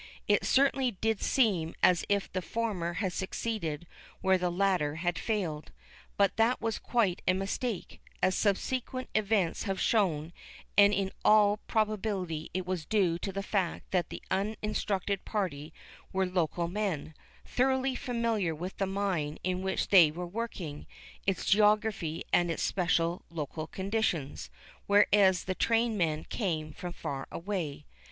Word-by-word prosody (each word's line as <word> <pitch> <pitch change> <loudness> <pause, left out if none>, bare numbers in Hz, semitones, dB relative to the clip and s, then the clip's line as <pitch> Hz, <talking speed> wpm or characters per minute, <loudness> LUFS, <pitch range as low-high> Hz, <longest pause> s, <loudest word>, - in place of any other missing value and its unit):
It - - +3
certainly 270 -1 +3
did 225 -2 0
seem 190 -11 +2
as 180 -2 +5
if 200 -1 0
the 185 - -1
former 190 -5 -2
had 185 +1 -2
succeeded 185 -5 -3 0.4
where 190 -1 +3
the 180 0 0
latter 175 -5 +1
had 175 +1 -1
failed. 175 -9 -2 0.5
But 200 0 +3
that 225 +3 +3
was 225 -1 -2
quite 215 -8 +1
a 185 - +4
mistake, 200 +3 -3 0.2
as 185 - +2
subsequent 255 +6 -1
events 205 -4 +1
have 195 -2 -2
shown, 170 -7 +1 0.4
and 200 0 +7
in 195 -2 0
all 210 -1 +5
probability 205 -7 -1
it 185 0 -3
was 180 -3 -2
due 185 -6 +2
to 195 - -3
the 195 +1 -4
fact 195 -4 -2
that 180 -3 +1
the - - -8
uninstructed 200 -1 -1
party 160 -8 -3 0.4
were 190 0 +1
local 175 -2 0
men, 175 -5 -2 0.3
thoroughly 265 +1 +1
familiar 230 -9 -1
with 180 +5 -6
the 195 - 0
mine 190 -6 -1
in 185 0 -1
which 190 0 -1
they 175 -6 +8
were 175 +4 -5
working, 175 -6 -5 0.4
its 195 - 0
geography 210 -5 +2
and 175 -1 +4
its 165 - -1
special 175 -2 +1
local 155 -1 -5
conditions, 190 -8 -2 0.4
whereas 200 -2 +5
the 185 - -2
trained 230 +3 +2
men 160 -5 0
came 155 -8 -3
from 175 +2 -6
far 140 -5 -5
away. 165 -6 -4
190 Hz, 145 wpm, -30 LUFS, 170-210 Hz, 0.5 s, they